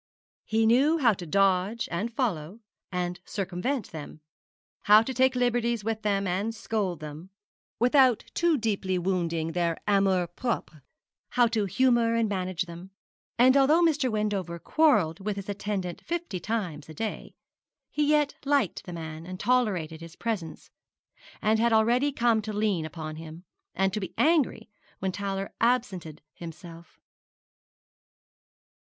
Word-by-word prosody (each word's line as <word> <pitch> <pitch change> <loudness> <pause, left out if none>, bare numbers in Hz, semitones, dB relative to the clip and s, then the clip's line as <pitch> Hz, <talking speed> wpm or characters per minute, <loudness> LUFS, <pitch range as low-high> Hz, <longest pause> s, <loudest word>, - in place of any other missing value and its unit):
He 220 +1 +1
knew 270 +8 +4
how 245 -8 +4
to 175 -3 -8
dodge, 195 +4 +2
and 205 +8 -2
follow, 210 - -2 0.3
and 180 -1 -2
circumvent 200 +6 -3
them; 155 -1 -9 0.6
how 210 +2 +7
to 265 - -4
take 260 +1 +3
liberties 240 -2 +1
with 220 0 -2
them, 200 -2 0
and 200 +5 -1
scold 200 -7 -2
them, 155 +4 -8 0.5
without 250 -1 +4
too 340 -2 +2
deeply 200 -5 -1
wounding 170 -3 -1
their 170 -1 0
amour 195 -3 +3
propre; 175 - -4 0.5
how 245 - +4
to 220 -3 0
humour 235 +2 +2
and 230 -1 +2
manage 185 -2 -2
them; 170 +2 -10 0.5
and 255 +2 +6
although 295 +5 +5
Mr. 300 -5 +2
Wendover 205 -5 -2
quarrelled 205 - +2
with 205 +1 -3
his 200 0 -7
attendant 200 -3 -3
fifty 340 - -3
times 175 -9 -3
a 155 - -10
day, 220 +6 -5 0.6
he 300 - 0
yet 300 -1 +3
liked 275 - +1
the 180 - -7
man, 160 0 -7
and 185 0 -7
tolerated 190 -11 0
his 165 0 -10
presence; 205 -9 -4 0.7
and 220 +1 +3
had 235 +1 +3
already 240 +6 +3
come 235 -4 +2
to 215 +1 -5
lean 205 -6 0
upon 155 0 -7
him, 160 +2 -10 0.3
and 190 0 +1
to 215 - -1
be 190 - -6
angry 315 -3 +2 0.3
when 190 0 -2
Towler 195 0 -4
absented 200 -11 0
himself. 170 0 -11
205 Hz, 145 wpm, -27 LUFS, 175-235 Hz, 0.7 s, how